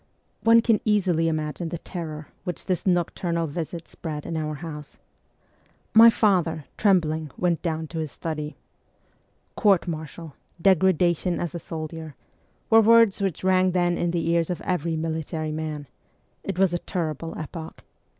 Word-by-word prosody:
One 230 0 +6
can 225 -2 +2
easily 185 -6 +2
imagine 155 +1 -2
the 170 - -4
terror 155 -4 -7
which 180 - -5
this 185 -3 -1
noctur 175 -1 0
nal 165 0 +1
visit 165 +2 -5
spread 150 -2 -6
in 165 - -4
our 155 -1 -2
house. 150 -1 -8 1.0
My 230 +1 +10
father, 180 -9 +1
trembling, 160 -6 +2
went 175 -2 +1
down 160 -2 -2
to 165 - -4
his 155 -3 -3
study. 155 -2 -5 0.5
' - - -41
Court 195 -5 +3
martial, 160 -1 -6 0.3
degradation 180 -1 +3
as 175 - -3
a 170 - -4
soldier,' 160 -2 -7 0.6
were 225 0 +8
words 225 -2 +5
which 190 -4 -2
rang 185 -1 +3
then 175 -1 +2
in 175 - 0
the 170 -1 -1
ears 170 -1 +1
of 180 - -2
every 170 -3 -1
military 160 -1 -3
man; 155 -2 -4 0.6
it 195 -3 -4
was 190 -2 +3
a 175 - 0
terrible 165 -3 -4
epoch. 160 +1 -8
170 Hz, 155 wpm, -25 LUFS, 155-185 Hz, 1.0 s, My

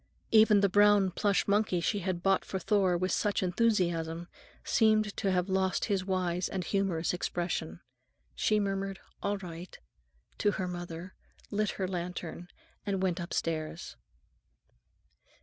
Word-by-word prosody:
Even 215 -2 +6
the 200 - +5
brown 205 -1 +5
plush 200 +2 +1
monkey 200 -3 +2
she 205 +5 0
had 185 -2 -3
bought 195 -1 +3
for 190 - -4
Thor 190 -1 +2
with 185 +2 -1
such 205 -2 +1
enthusiasm 175 -4 0 0.3
seemed 215 -2 +2
to 195 -3 0
have 180 0 +1
lost 190 -1 +1
his 200 -3 0
wise 180 -2 -1
and 190 -2 -3
humorous 185 -4 0
expression. 175 - -3 0.5
She 215 -1 +2
murmured, 195 -1 -2 0.2
"All 200 0 0
right," 175 -1 -9 0.6
to 205 - +2
her 185 - -2
mother, 175 0 -6 0.4
lit 210 0 0
her 190 - -1
lantern, 175 -1 -5 0.4
and 195 -2 -1
went 180 -1 0
upstairs. 165 -2 -3
190 Hz, 135 wpm, -30 LUFS, 175-200 Hz, 0.6 s, Even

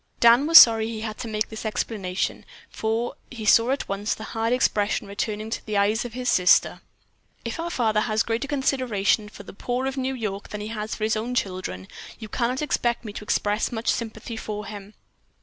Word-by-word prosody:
Dan 240 +5 +6
was 330 +1 +9
sorry 225 -2 +8
he 225 -1 -5
had 220 -1 -5
to 235 - -5
make 215 -1 -2
this 220 - -7
explanation, 205 -4 -2 0.3
for 225 +2 -2
he 230 -4 -7
saw 230 +3 +5
at 275 +1 -1
once 200 +2 -2
the 220 - -9
hard 225 +1 -2
expression 210 -5 +1
returning 210 +2 -4
to - - -3
the 215 -1 -2
eyes 210 +4 +2
of 240 - -7
his 250 0 -4
sister. 180 -6 +4 0.6
"If - - -4
our 335 +1 -2
father 225 -9 +1
has 215 0 +1
greater 230 +4 -2
consideration 250 -7 0
for - - -12
the - - -11
poor 245 +6 -3
of 270 0 -3
New 265 0 -1
York 205 -4 -5
than 210 - -6
he 210 - -5
has 215 -1 -4
for 215 - -6
his 220 +1 +1
own 235 +3 -3
children, 185 - -3 0.3
you 220 - -8
can 235 +3 0
not 260 +4 -2
expect 240 -5 -1
me 210 - -6
to 210 - -7
express 210 +1 0
much 230 0 -2
sympathy 225 0 -3
for 210 -1 -5
him." 205 0 -9
220 Hz, 210 wpm, -24 LUFS, 210-240 Hz, 0.6 s, was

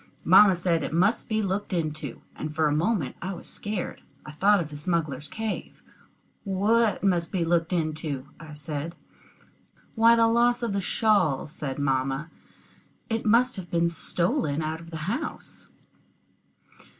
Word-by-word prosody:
Mamma 200 -3 +7
said 170 -2 0
it - - -4
must 190 +7 +2
be 220 -1 +1
looked 195 +1 -2
into, 155 -6 -3
and 155 0 -6
for 155 -1 +3
a 145 - +1
moment 170 - 0
I 190 +2 -3
was - - -11
scared. 205 -3 -4 0.2
I 150 - -8
thought 200 +7 +3
of 160 -3 -4
the - - -7
smugglers' 150 -3 -2
cave. 220 +4 -5 0.6
"What 210 +3 +2
must 175 -4 +1
be 180 -4 0
looked 170 +1 +1
into?" 155 -5 -2
I 155 -2 -10
said. 150 +3 -5 1.0
"Why, 230 +1 +6
the 230 0 +4
loss 240 +1 +3
of 230 -4 -1
the 200 - 0
shawl," 195 -8 +2
said 150 -4 -5
mamma. 135 +2 -1 0.8
"It 225 0 -1
must 245 +3 +4
have 180 -2 -7
been 170 0 +2
stolen 165 -3 0
out 160 +1 -3
of 165 0 -12
the 160 -2 -6
house." 265 - -5
170 Hz, 155 wpm, -26 LUFS, 155-205 Hz, 1.0 s, Mamma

